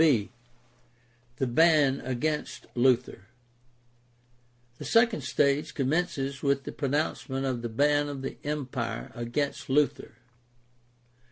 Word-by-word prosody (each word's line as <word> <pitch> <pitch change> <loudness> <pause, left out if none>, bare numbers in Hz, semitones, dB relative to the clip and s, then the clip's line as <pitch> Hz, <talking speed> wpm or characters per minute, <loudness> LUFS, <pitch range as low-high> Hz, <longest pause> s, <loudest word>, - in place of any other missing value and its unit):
b) 125 -11 +3 1.0
The 135 - -1
ban 145 +1 +4
against 150 +4 -2
Luther. 120 -5 +1 0.7
— 120 0 -37
The - - -7
second 230 -1 +3
stage 145 +2 +1
commences 140 -1 -1
with 140 -1 +1
the - - -6
pronouncement 140 -1 -2
of 130 -3 -2
the 120 - -4
ban 145 +5 +2
of 135 -2 -6
the 135 - -5
Empire 130 -6 -3
against 120 +5 -3
Luther. 145 -4 +1
135 Hz, 110 wpm, -28 LUFS, 120-145 Hz, 1.0 s, ban